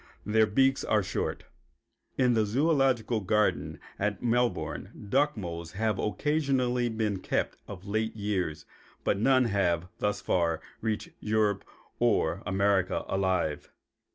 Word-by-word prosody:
Their 110 +1 +3
beaks 135 +5 +3
are 105 -2 +2
short. 95 - -3 0.7
In 125 -2 +4
the 110 - +3
zoölogical 125 -2 +2
garden 105 +2 +1 0.2
at 105 +1 -1
Melbourne 120 -2 -1
duck 145 +3 +2
moles 85 -3 -6
have 110 0 0
occasionally 125 -1 +1
been 110 -3 -1
kept - - -2
of 95 -1 -9
late 110 +2 -1
years, 95 -7 -2 0.4
but 100 - +1
none 130 +2 +4
have, 90 -5 +1
thus 105 0 0
far, 85 -2 +1 0.2
reached 110 -2 -2
Europe 105 -2 +1 0.4
or - - +2
America 95 0 +1
alive. 95 -6 0
105 Hz, 125 wpm, -29 LUFS, 95-120 Hz, 0.7 s, In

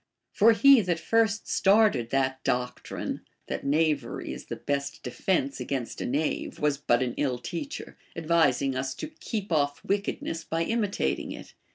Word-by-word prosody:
For 225 +2 +5
he 265 +3 +7
that 175 -4 -1
first 220 0 +1
started 195 - +3
that 130 0 0
doctrine, 125 0 -2 0.2
that - - -4
'knavery 150 -3 0
is - - -9
the - - -5
best 140 0 -3
defence 140 +1 -1
against 125 -1 -3
a - - -2
knave, 145 +5 -1
was 145 -2 +1
but 120 -2 +2
an 120 -2 -2
ill 130 -4 0
teacher, 175 - -6 0.2
advising 155 -5 +2
us 130 0 -2
to 310 - -6
keep 220 - -5
off 145 -2 +1
Λvickedness 195 -4 -2
by 165 +1 0
imitating 200 - -1
it. - - -11
155 Hz, 155 wpm, -27 LUFS, 130-200 Hz, 0.2 s, he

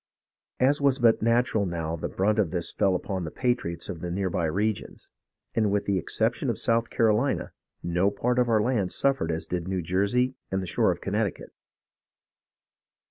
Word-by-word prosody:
As 140 +3 +3
was 140 -2 +3
but 115 -3 +4
natural 115 -2 +2
now 85 -2 -3
the 80 - -4
brunt 105 +3 +1
of 100 -6 +2
this 85 0 -2
fell 95 -2 +2
upon 95 0 -3
the 80 - -4
patriots 120 -7 -2
of 85 - -6
the 90 - -4
near 95 +1 -1
by 85 - 0
regions, 100 +6 -2 0.4
and 110 -2 +2
with 100 0 0
the 100 -2 +1
exception - - 0
of - - -1
South 115 0 +1
Carolina 115 +4 +1 0.3
no 90 +3 +2
part 120 +5 0
of 125 -1 +2
our 110 -2 +3
land 110 -7 0
suffered 135 -12 +1
as 80 0 -3
did 90 -1 -3
New 95 -2 -2
Jersey 100 +9 +1 0.2
and 95 - -1
the 95 - -4
shore 85 - +2
of - - -5
Connecticut. - - -2
100 Hz, 185 wpm, -26 LUFS, 90-120 Hz, 0.4 s, but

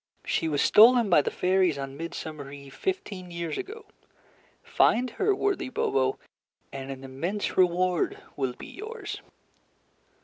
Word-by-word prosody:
"She 165 - 0
was 145 -3 +1
stolen 230 -1 +7
by 160 - +7
the - - -1
fairies 185 -4 +2
on 135 0 -5
midsummer 155 -2 -6
eve 140 -1 -11
fifteen 210 - -4
years 170 -2 -4
ago. 435 +2 -7 0.8
Find 245 +2 +2
her, 395 - +1
worthy 400 -8 -1
Bobo, 135 - 0 0.6
and 135 0 -6
an 135 0 -7
immense 165 +11 -3
reward 180 -1 +2 0.2
will 130 -3 -1
be - - -10
yours." 440 +4 -7
175 Hz, 135 wpm, -27 LUFS, 140-235 Hz, 0.8 s, stolen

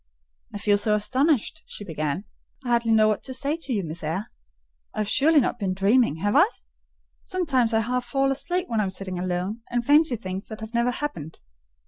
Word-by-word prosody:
"I - - -5
feel 205 0 +2
so 210 +1 +2
astonished," 270 +7 +1
she - - -7
began, 155 0 -3 0.4
"I - - -3
hardly 235 -1 +2
know 215 -1 +5
what 215 -1 0
to 260 - -4
say 280 +4 -1
to 285 -5 -4
you, 205 -5 0
Miss 160 0 -6
Eyre. 165 +8 -3 0.6
I - - -1
have 210 - -2
surely 300 +8 +4
not 245 -2 -1
been 190 -3 -1
dreaming, 200 - +3
have 205 0 +1
I? 335 +9 +6 0.7
Sometimes 290 - +1
I 225 0 +3
half 250 +2 -1
fall 270 +2 +1
asleep 355 +6 -2
when 225 -2 -1
I - - +3
am 195 - -1
sitting 185 -1 -5
alone 185 +5 -2
and 240 -1 -1
fancy 295 -1 +5
things 190 -3 -6
that 220 - -8
have 220 +1 -8
never 235 +1 +2
happened. 245 - -5
225 Hz, 205 wpm, -25 LUFS, 195-270 Hz, 0.7 s, I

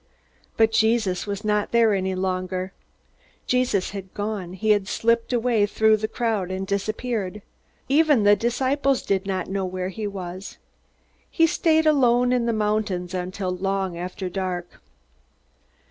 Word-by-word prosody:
But 225 0 +4
Jesus 220 -4 +1
was 205 +1 -4
not 210 -1 0
there 230 -2 +4
any 190 -1 -1
longer. 185 0 -2 0.7
Jesus 250 -7 +1
had 195 -2 -7
gone; 205 -4 -4
he 215 +3 +1
had 205 -2 +2
slipped 230 +2 +1
away 235 -4 +2
through 220 +1 +3
the 215 +1 -2
crowd 220 -5 -1
and 190 +1 -3
disappeared. 210 0 -3 0.4
Even 290 -4 +4
the 205 0 +6
disciples 260 +5 0
did 195 0 -1
not 185 -2 -1
know 195 0 -2
where 185 0 -3
he 210 +2 -4
was. 185 -1 -7 0.7
He 330 - +3
stayed 320 0 +2
alone 250 -4 +4
in 240 -2 +1
the - - +2
mountains 210 -4 -1
until 185 +1 -3
long 195 -1 -2
after 180 +2 -5
dark. 180 -1 -4
205 Hz, 145 wpm, -24 LUFS, 185-230 Hz, 0.7 s, the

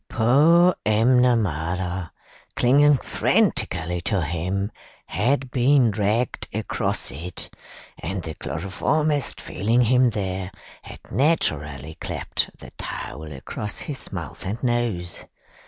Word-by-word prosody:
Poor 155 +10 +5
M'Namara, 95 - +2 0.5
clinging 145 +3 +5
frantically 85 -7 +1
to 95 0 0
him, 90 +6 -2 0.3
had 130 +5 0
been 130 -1 +4
dragged 105 +4 0
across - - 0
it, 85 +7 -7 0.4
and 95 -2 -4
the 80 - -5
chloroformist, 140 - -1
feeling 115 +7 +1
him 125 +1 +4
there, 95 -3 -3 0.3
had - - -11
naturally 75 - 0
claped - - -2
the - - -12
towel 75 +3 -6
across 75 +9 -6
his 140 -3 -7
mouth 85 -7 -6
and 105 +7 -4
nose. 120 -8 -1
105 Hz, 105 wpm, -23 LUFS, 90-125 Hz, 0.5 s, Poor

